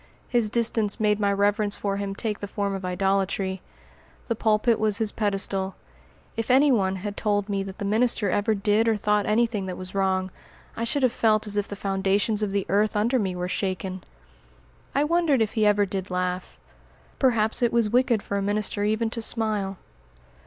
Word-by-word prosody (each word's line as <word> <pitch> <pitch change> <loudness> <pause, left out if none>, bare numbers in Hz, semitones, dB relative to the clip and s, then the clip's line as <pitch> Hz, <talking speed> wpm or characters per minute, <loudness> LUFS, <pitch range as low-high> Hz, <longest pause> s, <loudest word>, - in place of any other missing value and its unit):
His 235 -3 +1
distance 225 -1 0
made 210 -1 +2
my 200 -1 +2
reverence 205 +1 +1
for 200 -1 -2
him 200 -1 -3
take 215 -1 -3
the 205 - -5
form 200 0 -2
of 195 -1 -5
idolatry. 190 0 -1 0.7
The 230 - +1
pulpit 220 +1 +2
was 215 -2 +1
his 220 -1 0
pedestal. 195 -2 -1 0.6
If 225 +1 -3
any 275 +3 +5
one 195 -6 +2
had 200 +2 -5
told 205 -2 0
me 200 -2 -1
that 195 0 -7
the 200 - -4
minister 220 +1 +2
ever 215 +3 +1
did 210 +2 +2
or 225 -1 +2
thought 210 0 +1
anything 215 -2 +1
that 185 - -5
was 185 0 -7
wrong, 190 -1 0 0.4
I 230 - -2
should 270 +4 -1
have 255 - +4
felt 215 -2 +2
as 205 -1 -3
if 205 -1 0
the 205 - -6
foundations 195 +2 0
of 210 -2 -1
the 200 -1 -1
earth 210 +4 +1
under 235 +5 +2
me 190 -4 -1
were 180 0 -3
shaken. 185 -1 -3 0.9
I 280 - +3
wondered 325 -3 +2
if 220 -2 0
he 215 -2 +2
ever 205 0 +3
did 190 -1 -5
laugh. 180 0 -3 0.6
Perhaps 225 -5 +2
it 240 -1 +3
was 235 -2 +2
wicked 240 -1 +2
for 200 - -3
a - - -1
minister 205 +1 -1
even 220 +2 0
to 230 - -1
smile. 215 -4 0
205 Hz, 195 wpm, -25 LUFS, 195-225 Hz, 0.9 s, any